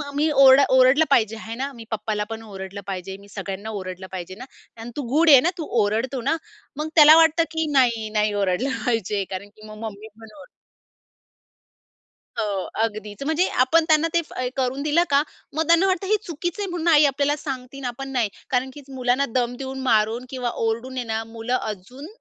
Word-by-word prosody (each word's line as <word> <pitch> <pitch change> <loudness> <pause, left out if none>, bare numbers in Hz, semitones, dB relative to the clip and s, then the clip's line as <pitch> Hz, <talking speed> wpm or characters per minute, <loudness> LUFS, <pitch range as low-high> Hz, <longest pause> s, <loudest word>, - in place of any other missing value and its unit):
मी 300 +2 +2
or 270 -1 +7
ओरडलं 260 +4 +5
पाहिजे 225 -5 +3
आहे 225 +1 -7
ना? 270 +3 -4
मी 230 -2 -11
पप्पाला 215 -1 -2
पण 225 0 -5
ओरडलं 195 -1 -8
पाहिजे, 190 0 -5
मी 200 0 -17
सगळ्यांना 195 +1 -6
ओरडलं 185 0 -7
पाहिजे 185 0 -7
ना? 255 - -7 0.4
आणि 235 +1 -8
तू - - -1
गुड 325 +1 +5
आहे 275 -3 +10
ना? 340 - +2
तू 320 - -5 0.2
ओरडतो 235 +5 -1
ना?" 280 +6 +1 0.4
मग 305 +1 -2
त्याला 305 0 +9
वाटतं, 330 0 +4
की 320 0 -1
नाही, 235 -5 +2
नाही 210 -1 0
ओरडलं 200 +6 0 0.2
पाहिजे. 210 -4 0
कारण 190 +1 -6
की 215 0 -14
मग 215 0 -10
मम्मी 215 -1 -7
पण 225 0 -13
ओरडेल. 280 - -13 1.9
हो 200 -3 -1 0.2
अगदीच. 215 +2 -4
म्हणजे 320 +4 +1 0.2
आपण 320 +5 +3
त्यांना 315 +1 +4
ते 340 - +3 0.4
करून 260 +1 -1
दिलं 305 +3 +3
का, 280 0 +4 0.3
मग 315 +2 0
त्यांना 335 +3 +5
वाटतं 375 0 -1
हे 430 - +3
चुकीच 345 +3 -4
आहे 405 - -2
म्हणून 345 -1 -3
आई 305 -2 +6
आपल्याला 285 +1 +1
सांगतेय 270 -2 -6
आणि 260 - -4
आपण 270 +3 -6
नाही, 240 -5 0 0.2
कारण 260 +1 0
की 290 - -11
मुलांना 255 +1 0
दम 245 0 -2
देऊन, 265 0 -6
मारून 230 -1 +1
किंवा 250 -2 -3 0.2
ओरडून 235 +4 -3
आहे 250 - -1
ना 225 0 -2
मुलं 225 +2 -3
अजून 220 - -7
250 Hz, 195 wpm, -23 LUFS, 215-290 Hz, 1.9 s, आहे